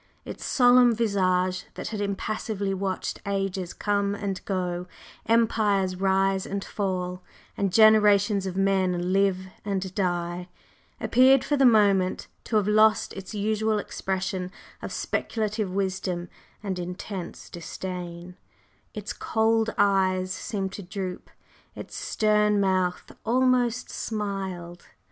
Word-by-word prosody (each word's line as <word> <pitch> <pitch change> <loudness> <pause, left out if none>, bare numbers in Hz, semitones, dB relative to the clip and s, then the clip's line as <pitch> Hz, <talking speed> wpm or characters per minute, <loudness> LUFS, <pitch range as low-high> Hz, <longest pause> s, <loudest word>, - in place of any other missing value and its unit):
Its - - -7
solemn 245 -2 +5
visage 185 -4 +1
that - - -5
had 215 -2 -4
impassively 200 0 -2
watched 190 0 -3
ages 195 -2 -2
come 200 -1 0
and 195 -2 -4
go, 180 -2 -2 0.4
empires 210 -5 +2
rise 195 0 +1
and 200 0 -4
fall, 180 -2 -3 0.3
and 195 -2 0
generations 210 -2 +5
of 185 0 -5
men 185 -2 +1
live 195 -1 +2 0.2
and 190 -2 -3
die, 175 -2 -2 0.5
appeared 260 +2 +5
for 295 - 0
the 270 -2 +5
moment 200 -5 +3 0.2
to 225 - -3
have 210 -2 +3
lost 215 +1 +4
its 195 +2 -8
usual 215 +1 0
expression 190 -2 -3 0.3
of - - -6
speculative 215 -3 -2
wisdom 185 -2 -2 0.3
and 190 -3 -3
intense 180 +1 -6
disdain 175 0 -7 0.6
its 210 0 -5
cold 225 0 +1
eyes 185 -2 +2
seemed 190 0 -3
to 205 - -6
droop, 185 0 -6 0.5
its - - -9
stern 210 -1 +2
mouth 185 -2 0
almost 245 0 +1
smiled. 190 -5 -4
195 Hz, 115 wpm, -26 LUFS, 185-215 Hz, 0.6 s, solemn